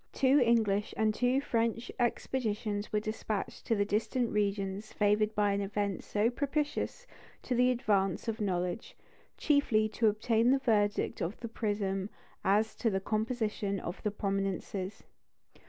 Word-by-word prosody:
Two 270 +2 +4
English 215 -3 +2
and 220 -1 +2
two 250 +4 +2
French 230 -2 -1
expeditions 215 -4 -1
were 210 - +2
despatched 215 -1 -4
to 225 - +3
the 205 -1 +1
distant 225 +4 0
regions 200 0 -1
favoured 210 +1 +2
by 205 -1 +3
an 200 0 0
event 200 -1 -2
so 210 +2 +1
propitious 295 - -2 0.4
to 255 - -2
the 250 +1 +4
advance 205 -6 +1
of 225 0 -2
knowledge, 180 +1 -2 0.4
chiefly 265 -8 +3
to 220 +1 +1
obtain 225 +2 +2
the 270 - +5
verdict 210 -5 +1
of 175 +6 -3
the 235 - -4
prism 205 -3 -2 0.3
as 210 +3 +2
to 230 - 0
the 190 -2 0
composition 215 -1 -1
of 175 - -6 0.2
prominences. 195 0 -2
215 Hz, 140 wpm, -31 LUFS, 200-235 Hz, 0.4 s, the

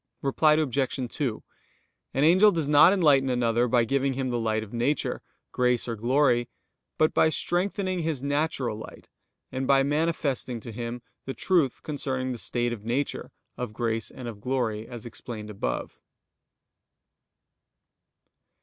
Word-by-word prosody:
Reply 150 +3 +4
Obj. 140 -4 0 0.2
2: 125 -7 -2 0.7
An 135 - +2
angel 185 +7 +6
does 165 -6 -1
not 150 +4 +7
enlighten 145 -8 +4
another 120 -1 +2
by 120 0 +3
giving 135 +2 +1
him 130 -1 -2
the 120 - 0
light 110 -1 0
of 110 - -12
nature, 120 +6 -1 0.3
grace, 125 -1 +1
or 115 - -2
glory; 120 +1 +2 0.5
but 155 - +3
by 160 - +4
strengthening 185 +3 -1
his 155 -5 -2
natural 140 -5 -1
light, - - -11 0.4
and 130 0 -3
by 135 -1 +5
manifesting 145 -4 -1
to 115 - -7
him 120 +2 -5 0.2
the 135 - -5
truth 165 -9 +1
concerning 130 -3 -2
the 120 - -5
state 120 +1 -1
of 105 -3 -8
nature, 125 +5 -2 0.3
of 125 -3 -4
grace, 115 0 -2
and 125 - -9
of 105 -3 -8
glory, 115 -3 -1
as 120 -3 -9
explained 110 -2 -7
above. 60 -12 -4
130 Hz, 145 wpm, -27 LUFS, 120-145 Hz, 0.7 s, not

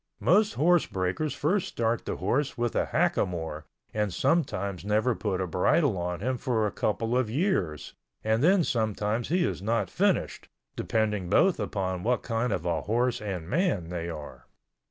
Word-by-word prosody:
Most 210 +5 +3
horse 175 +2 +3
breakers 95 +12 -2
first 180 +6 +1
start 115 0 -1
the - - -2
horse 135 +9 -1
with 120 -1 -1
a - - +1
hackamore 80 -4 -1 0.3
and 105 -2 0
sometimes 100 - 0
never 110 +5 +2
put 100 -4 -2
a 95 - 0
bridle 100 - +2
on 90 0 -3
him 125 +2 -1
for 115 -5 0
a 105 - -1
couple 115 +3 -1
of 125 -3 +1
years 110 - -1 0.3
and 110 +3 +1
then 185 +2 +5
sometimes 110 -2 -1
he 175 +2 +2
is - - -3
not 115 +3 0
finished, 200 +1 0 0.3
depending 105 -5 -1
both 185 - +4 0.2
on 95 -2 -1
what 125 +5 0
kind 115 0 -1
of 90 -4 -2
a 85 -2 0
horse 120 +3 0
and 95 -6 -4
man 105 - 0
they 85 -1 -4
are. 75 -3 -9
110 Hz, 170 wpm, -28 LUFS, 95-130 Hz, 0.3 s, then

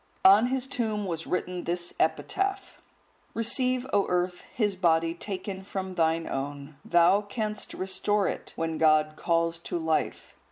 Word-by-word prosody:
On 200 +5 +8
his 260 0 0
tomb 220 -6 -2
was 165 -3 -4
written 180 0 -2
this 175 0 -2
epitaph: 390 +1 -1 0.5
Receive, 250 +2 +1
O 200 -1 +3
Earth, 180 0 -1
his 210 -4 0
body 165 -2 +2
taken 190 +1 -5
from 190 -1 -5
thine 165 -1 +1
own; 140 +2 -5
thou 175 +4 +4
canst 210 0 -4
restore 195 +1 0
it, - - -4
when 165 -1 -2
God 155 -1 +4
calls 165 0 0
to 170 - -3
life. 160 -1 -2
185 Hz, 145 wpm, -27 LUFS, 165-210 Hz, 0.5 s, On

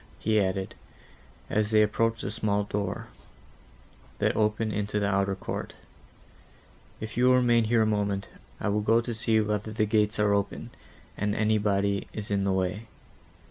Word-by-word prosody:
he 110 0 +1
added, 95 0 -2 0.7
as 105 -1 0
they 110 -1 +5
approached 115 +1 0
the 100 - -3
small 105 -1 0
door, 100 -1 -4 1.1
that - - +1
opened 110 0 0
into 105 0 -1
the 100 - 0
outer 100 0 +1
court, - - -5 1.3
"if 110 0 -6
you 125 +2 +3
will 125 0 +6
remain 120 -2 +3
here 115 0 +3
a - - +2
moment, 100 -2 -1 0.3
I - - -1
will 105 +1 +1
go 115 +2 +3
to 120 0 -3
see 110 0 +2
whether 105 0 -2
the 110 0 +1
gates 105 0 +1
are 105 -1 +3
open, 100 0 -2 0.4
and 105 0 -1
anybody 100 -2 +1
is 105 -1 -5
in 100 -1 +1
the 100 - +1
way. 95 +4 -1
105 Hz, 165 wpm, -27 LUFS, 100-110 Hz, 1.3 s, will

